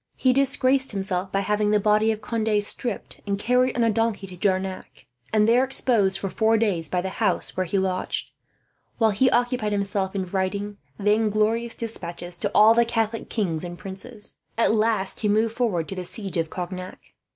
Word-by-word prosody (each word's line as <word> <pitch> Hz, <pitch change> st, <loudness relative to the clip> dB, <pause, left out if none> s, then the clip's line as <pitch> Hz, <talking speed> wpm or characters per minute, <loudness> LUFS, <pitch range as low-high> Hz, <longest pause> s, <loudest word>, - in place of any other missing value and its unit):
He 255 Hz, -1 st, +3 dB
disgraced 270 Hz, -1 st, +2 dB
himself 190 Hz, -1 st, -2 dB
by 195 Hz, -, +1 dB
having 210 Hz, +1 st, 0 dB
the 210 Hz, 0 st, +3 dB
body 215 Hz, +2 st, +3 dB
of 215 Hz, 0 st, -4 dB
Conde 225 Hz, 0 st, -1 dB
stripped 225 Hz, +1 st, -3 dB
and 200 Hz, 0 st, 0 dB
carried 250 Hz, +4 st, +2 dB
on 235 Hz, -, +2 dB
a 230 Hz, -, +3 dB
donkey 225 Hz, -2 st, 0 dB
to 185 Hz, -1 st, -10 dB
Jarnac, 190 Hz, 0 st, -2 dB, 0.3 s
and 215 Hz, -1 st, +3 dB
there 240 Hz, +3 st, +5 dB
exposed 225 Hz, -7 st, +2 dB
for 195 Hz, -, -3 dB
four 220 Hz, +3 st, +2 dB
days 185 Hz, -8 st, 0 dB
by 180 Hz, -, 0 dB
the 190 Hz, -, -2 dB
house 200 Hz, -5 st, +1 dB
where 185 Hz, -1 st, -1 dB
he 195 Hz, -, 0 dB
lodged; 190 Hz, -1 st, -2 dB, 0.7 s
while 225 Hz, -2 st, +3 dB
he 255 Hz, +6 st, +3 dB
occupied 245 Hz, -4 st, +1 dB
himself 200 Hz, -1 st, -1 dB
in 190 Hz, -1 st, -1 dB
writing 200 Hz, +2 st, -3 dB, 0.2 s
vainglorious 215 Hz, +2 st, +1 dB
despatches 175 Hz, -6 st, -6 dB
to 205 Hz, -, -1 dB
all 215 Hz, +2 st, +7 dB
the 235 Hz, +1 st, +4 dB
Catholic 225 Hz, -1 st, -2 dB
kings 180 Hz, -8 st, -1 dB
and 175 Hz, 0 st, -6 dB
princes. 205 Hz, +4 st, -5 dB, 0.2 s
At 230 Hz, -, +3 dB
last 215 Hz, -3 st, 0 dB
he 210 Hz, -, 0 dB
moved 220 Hz, +2 st, +1 dB
forward 195 Hz, -10 st, 0 dB
to 195 Hz, -, -5 dB
the 185 Hz, -, -4 dB
siege 190 Hz, 0 st, -5 dB
of 165 Hz, -1 st, -1 dB
Cognac. 185 Hz, +1 st, -6 dB
210 Hz, 185 wpm, -24 LUFS, 190-225 Hz, 0.7 s, all